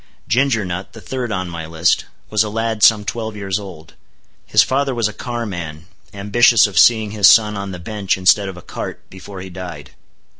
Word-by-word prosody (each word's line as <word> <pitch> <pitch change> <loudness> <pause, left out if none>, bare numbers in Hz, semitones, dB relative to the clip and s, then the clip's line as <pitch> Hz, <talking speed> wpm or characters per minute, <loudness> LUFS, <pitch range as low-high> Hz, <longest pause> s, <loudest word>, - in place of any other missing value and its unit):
Ginger 115 +1 +1
Nut, 90 +1 -6
the 115 - -11
third 125 +1 -5
on 95 -3 -2
my 85 -2 -7
list, 80 +2 +1 0.3
was 105 0 +3
a 105 - -4
lad 115 0 -2
some 105 +1 +5
twelve 110 +1 -4
years 100 -1 -3
old. 85 -6 -11 0.5
His - - +5
father 135 0 -1
was 115 -2 +1
a 105 - -7
carman, 90 -10 -6 0.3
ambitious 110 +3 +4
of 100 -5 0
seeing 110 -3 +4
his 105 -2 +4
son 105 -3 +5
on 100 0 -5
the 90 - -6
bench 100 +2 -2
instead 95 +2 +3
of 95 - -9
a 90 - -12
cart, - - -7
before 95 0 -10
he 95 0 -9
died. 85 -6 -9
100 Hz, 195 wpm, -18 LUFS, 90-110 Hz, 0.5 s, some